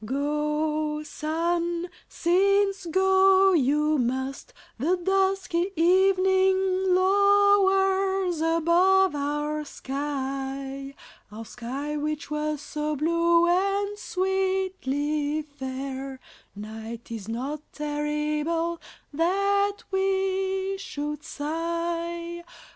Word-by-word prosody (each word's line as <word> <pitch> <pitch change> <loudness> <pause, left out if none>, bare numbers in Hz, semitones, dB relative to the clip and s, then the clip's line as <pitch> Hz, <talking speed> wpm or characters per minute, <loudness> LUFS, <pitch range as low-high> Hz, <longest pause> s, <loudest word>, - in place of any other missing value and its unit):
Go, 300 +3 -1
sun, 335 +3 -2 0.2
since 395 +2 +2
go 380 +2 +4
you 300 0 +2
must, 260 - -2 0.3
The 340 +8 +1
dusky 380 -1 0
evening 375 +1 +3
lowers 390 -2 +3
above 340 +3 +3
our 295 +1 -2
sky, 275 -1 -5 0.4
Our 225 +2 -8
sky 270 +7 -5
which 300 0 -3
was 300 -1 -2
so 300 +1 -3
blue 335 +3 +3
and 395 +3 +1
sweetly 365 -7 -1
fair; 270 -1 -6 0.4
Night 220 +3 -8
is 220 -3 -6
not 270 +6 -4
terrible 300 +3 -2 0.3
that 395 +5 +1
we 385 0 0
should 295 -5 -5
sigh. 335 +2 -3
335 Hz, 80 wpm, -26 LUFS, 295-380 Hz, 0.4 s, go